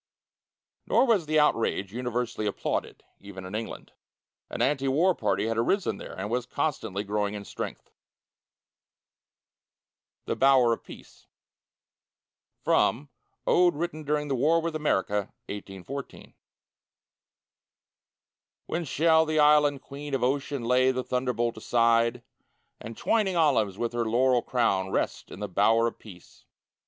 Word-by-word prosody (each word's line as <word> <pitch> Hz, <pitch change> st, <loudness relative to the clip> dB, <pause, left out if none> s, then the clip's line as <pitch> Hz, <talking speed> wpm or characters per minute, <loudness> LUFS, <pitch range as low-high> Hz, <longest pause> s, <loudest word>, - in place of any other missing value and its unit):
Nor -, -, +4 dB
was 210 Hz, -, +2 dB
the 155 Hz, 0 st, +3 dB
outrage 115 Hz, -8 st, +1 dB
universally 120 Hz, -3 st, -2 dB
applauded, 100 Hz, -, -3 dB, 0.2 s
even 95 Hz, -2 st, -10 dB
in 95 Hz, -, -8 dB
England. 110 Hz, +1 st, -6 dB, 0.6 s
An -, -, -6 dB
anti 135 Hz, -1 st, +1 dB
war 165 Hz, +8 st, +3 dB
party 105 Hz, -, -1 dB
had 115 Hz, 0 st, -1 dB
arisen 195 Hz, -, 0 dB
there, -, -, -9 dB
and 95 Hz, +2 st, -3 dB
was 125 Hz, 0 st, -1 dB
constantly 115 Hz, -10 st, -2 dB
growing 105 Hz, 0 st, -2 dB
in 100 Hz, -1 st, -7 dB
strength. -, -, -7 dB, 2.3 s
THE -, -, -2 dB
BOWER 130 Hz, -3 st, +5 dB
OF -, -, -6 dB
PEACE -, -, -14 dB, 1.4 s
From 140 Hz, +5 st, +2 dB, 0.4 s
"Ode 175 Hz, -2 st, +4 dB
Written 160 Hz, 0 st, -3 dB
during 150 Hz, 0 st, -1 dB
the 140 Hz, -, -1 dB
War 150 Hz, +6 st, +3 dB
with 165 Hz, -1 st, -3 dB
America, 105 Hz, -9 st, 0 dB, 0.2 s
1814" 100 Hz, +7 st, -8 dB, 2.3 s
When 170 Hz, +1 st, -3 dB
shall 160 Hz, +3 st, +3 dB
the 155 Hz, 0 st, -2 dB
Island 150 Hz, -2 st, +4 dB
Queen 140 Hz, 0 st, -5 dB
of 125 Hz, -, -2 dB
Ocean 140 Hz, 0 st, -1 dB
lay 125 Hz, +2 st, +3 dB
The 130 Hz, -1 st, -1 dB
thunderbolt 125 Hz, -3 st, -1 dB
aside, 115 Hz, +1 st, +2 dB, 0.6 s
And, 115 Hz, 0 st, -9 dB
twining 205 Hz, -5 st, +1 dB
olives 130 Hz, -, +2 dB
with 120 Hz, +1 st, -2 dB
her 120 Hz, -1 st, -1 dB
laurel 125 Hz, +2 st, +3 dB
crown, 100 Hz, -8 st, 0 dB
Rest -, -, -2 dB
in 100 Hz, -, -10 dB
the 105 Hz, -, -2 dB
Bower 110 Hz, +5 st, +3 dB
of 115 Hz, -, -3 dB
Peace? 90 Hz, -6 st, -15 dB
125 Hz, 130 wpm, -27 LUFS, 110-150 Hz, 2.3 s, BOWER